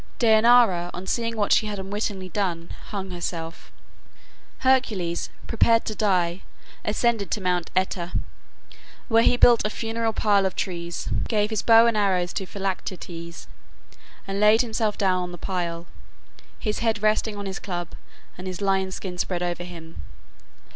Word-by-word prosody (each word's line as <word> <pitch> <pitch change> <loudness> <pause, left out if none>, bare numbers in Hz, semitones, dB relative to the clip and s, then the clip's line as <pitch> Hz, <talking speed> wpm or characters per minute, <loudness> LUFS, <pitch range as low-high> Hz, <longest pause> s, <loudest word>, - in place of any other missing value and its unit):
Dejanira, 220 -6 +5
on 180 +2 -7
seeing 230 +2 -1
what 205 -1 0
she 215 - +4
had 210 -1 -4
unwittingly 195 -1 -3
done, 175 -4 -2 0.2
hung 195 -2 -5
herself. 170 -2 -5 0.9
Hercules, 215 -10 +1 0.2
prepared 230 0 +3
to 215 - -2
die, 185 -4 +1 0.4
ascended 215 -1 0
Mount 180 -3 -1
Oeta, 185 -2 0 1.0
where 225 -1 +5
he 245 - +4
built 240 -1 +6
a 210 - 0
funeral 225 +1 -2
pile 205 -3 +2
of 190 - -6
trees, 170 -2 -4 0.2
gave 210 -1 +1
his 220 - 0
bow 230 0 +7
and 235 -1 +2
arrows 185 -4 +1
to 190 - -3
Philoctetes, 180 -3 -5 0.8
and 195 0 -3
laid 210 +2 +6
himself 220 -2 -1
down 185 -2 +2
on 180 0 -5
the 175 - -8
pile, 170 -2 -3 0.7
his 210 -1 -2
head 225 -2 0
resting 215 0 +1
on 200 - -5
his 195 0 -4
club, 175 -4 -4 0.5
and 185 - -6
his 185 -1 -5
lion's 190 -1 0
skin 180 -2 -6
spread 180 -1 -1
over 175 0 -2
him. 165 - -10
195 Hz, 150 wpm, -24 LUFS, 180-220 Hz, 1.0 s, bow